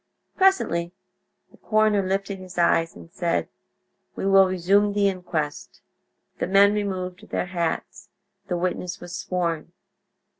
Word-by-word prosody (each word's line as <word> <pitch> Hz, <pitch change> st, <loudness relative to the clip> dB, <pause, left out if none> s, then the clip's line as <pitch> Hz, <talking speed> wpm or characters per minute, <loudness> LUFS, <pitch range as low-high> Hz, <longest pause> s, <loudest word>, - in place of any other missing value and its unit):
Presently 180 Hz, -, +2 dB, 0.6 s
the -, -, -20 dB
coroner 215 Hz, -2 st, +2 dB
lifted 195 Hz, +1 st, -2 dB
his 185 Hz, -1 st, -11 dB
eyes 165 Hz, -1 st, +2 dB
and 85 Hz, -1 st, -13 dB
said: -, -, -1 dB, 0.7 s
"We -, -, -4 dB
will 195 Hz, -1 st, +6 dB
resume 195 Hz, +3 st, +2 dB
the 200 Hz, -1 st, +3 dB
inquest." 170 Hz, -6 st, -3 dB, 0.6 s
The -, -, -1 dB
men 200 Hz, +2 st, +5 dB
removed 190 Hz, -3 st, -4 dB
their -, -, -1 dB
hats. 175 Hz, -2 st, -3 dB, 0.4 s
The 180 Hz, -, -1 dB
witness 180 Hz, 0 st, -3 dB
was 175 Hz, 0 st, -8 dB
sworn. 170 Hz, -3 st, -2 dB
185 Hz, 125 wpm, -24 LUFS, 175-200 Hz, 0.7 s, will